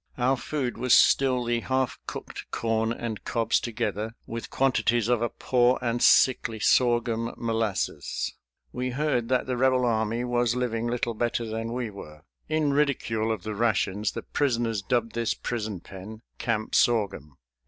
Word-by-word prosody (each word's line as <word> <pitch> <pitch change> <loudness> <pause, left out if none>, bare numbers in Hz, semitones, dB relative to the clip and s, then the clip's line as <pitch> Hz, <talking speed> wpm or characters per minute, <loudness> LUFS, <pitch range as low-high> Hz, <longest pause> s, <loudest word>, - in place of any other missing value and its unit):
Our 130 +2 +2
food 125 -1 -3
was 125 0 +5
still 130 -2 +4
the 120 0 0
half 130 +1 -1
cooked - - -7
corn 115 0 0
and 115 -2 -4
cobs 115 -1 +1
together, 110 -1 -3
with 115 0 -6
quantities 120 -4 +1
of 120 -2 +2
a 120 - +1
poor 125 0 +2
and 120 -1 -1
sickly 115 -4 +4
sorghum 120 0 +2
molasses. 115 -3 -2 0.4
We 125 +1 -2
heard 125 -3 0
that 130 -1 +2
the 125 -1 -2
Rebel 130 0 +3
army 115 0 0
was 120 -1 +1
living 120 -2 -1
little 120 0 -1
better 120 +1 -1
than 115 +1 -4
we 120 -2 -3
were. 75 -6 -11 0.3
In 155 -2 +1
ridicule 115 -6 +1
of 110 -5 -3
the 110 0 -4
rations 105 -2 0
the - - -5
prisoners 120 -6 0
dubbed 115 +2 0
this 115 -2 0
prison 110 -6 -4
pen 105 +4 -10 0.2
"Camp 110 -2 -2
Sorghum." 95 - +1
115 Hz, 155 wpm, -26 LUFS, 110-125 Hz, 0.4 s, was